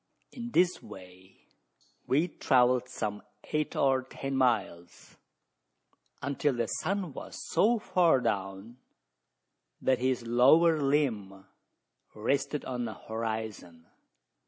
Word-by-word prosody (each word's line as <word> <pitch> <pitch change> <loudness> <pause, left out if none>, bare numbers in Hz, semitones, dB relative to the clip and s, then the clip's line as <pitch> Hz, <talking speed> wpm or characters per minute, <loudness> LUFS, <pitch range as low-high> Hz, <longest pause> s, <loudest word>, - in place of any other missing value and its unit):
In 240 -2 -7
this 180 -5 +2
way 95 0 -14 0.7
we 145 +5 +3
had 175 - -8
travelled 125 0 +3
some 105 -4 -4 0.3
eight 155 -1 -1
or 135 -1 +2
ten 135 +1 -6
miles 110 -9 -1 1.1
until 140 0 0
the 120 -1 0
sun 185 - -3
was - - -9
so 220 +8 +3
far 180 - +3
down, 100 0 -3 1.0
that 130 -2 +1
his 125 -1 0
lower 150 +7 +5
limb 110 -10 -1 0.7
rested 135 +6 -1
on 125 -2 -3
the 110 -2 -6
horizon. 110 -7 -5
125 Hz, 110 wpm, -29 LUFS, 110-145 Hz, 1.1 s, lower